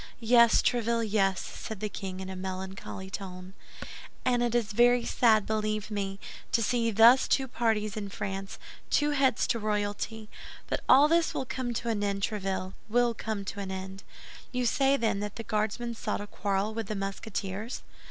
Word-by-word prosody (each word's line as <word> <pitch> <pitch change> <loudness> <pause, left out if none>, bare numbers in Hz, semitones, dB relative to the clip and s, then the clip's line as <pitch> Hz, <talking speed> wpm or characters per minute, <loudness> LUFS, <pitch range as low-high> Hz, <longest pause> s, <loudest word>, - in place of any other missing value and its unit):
"Yes, 235 0 +5
Tréville, 235 -1 +1
yes," 195 -3 +2
said 220 -3 -7
the 215 - -2
king, 190 -2 -6
in 190 - -6
a - - -6
melancholy 190 0 -6
tone; 185 -1 -7 0.7
"and 245 -1 +2
it 240 -1 +1
is 225 -3 +1
very 240 +2 +4
sad, 220 -4 +3
believe 215 -1 -2
me, 195 -1 -3 0.3
to 230 - +3
see 230 +1 +1
thus 230 +4 +6
two 265 -1 +2
parties 220 -4 0
in 205 -2 -4
France, 195 -1 -5 0.3
two 295 0 +2
heads 270 -5 +2
to 230 - 0
royalty. 210 +1 -2 0.4
But - - -2
all 280 +3 +8
this 330 +1 +2
will 265 - -1
come 250 -1 -3
to 235 - -2
an 210 -2 0
end, 200 -1 -1
Tréville, 195 -3 -2 0.2
will 240 +1 +3
come 215 -2 -4
to 200 - -5
an 195 -1 -4
end. 190 0 -6 0.5
You 250 -1 -1
say, 270 +3 +3
then, 225 -5 0
that 205 0 -4
the 230 - -5
Guardsmen 220 +3 -1
sought 220 -2 -3
a 205 - -5
quarrel 200 +1 -1
with 225 -2 -4
the 215 - -3
Musketeers?" 195 +2 -4
215 Hz, 180 wpm, -29 LUFS, 195-235 Hz, 0.7 s, all